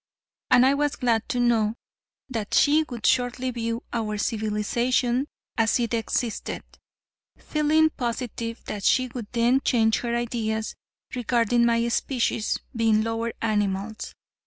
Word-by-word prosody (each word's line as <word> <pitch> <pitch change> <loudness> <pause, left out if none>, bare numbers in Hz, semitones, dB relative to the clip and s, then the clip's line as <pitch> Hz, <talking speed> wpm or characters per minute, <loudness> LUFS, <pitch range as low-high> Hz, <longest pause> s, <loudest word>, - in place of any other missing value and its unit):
And 250 0 +6
I 270 - +5
was 290 0 0
glad 230 -3 0
to 250 - -1
know 230 -3 +2 0.5
that 225 -6 -3
she 300 +2 +5
would 235 -4 -6
shortly 250 0 +1
view 230 -1 -3
our 215 -3 -2
civilization 235 +4 0 0.3
as 225 +2 +3
it 235 -1 -1
existed, 230 0 -2 0.7
feeling 310 +1 +2
positive 235 -2 -4
that 205 -2 -5
she 255 +4 +3
would 235 -3 -6
then 240 +3 +3
change 225 -3 +3
her 235 -1 -2
ideas 220 -2 -2 0.4
regarding 240 -1 +2
my 230 0 +2
species 235 -2 0 0.2
being 220 -2 +3
lower 225 +1 -2
animals. 205 -1 -1
235 Hz, 130 wpm, -25 LUFS, 220-250 Hz, 0.7 s, And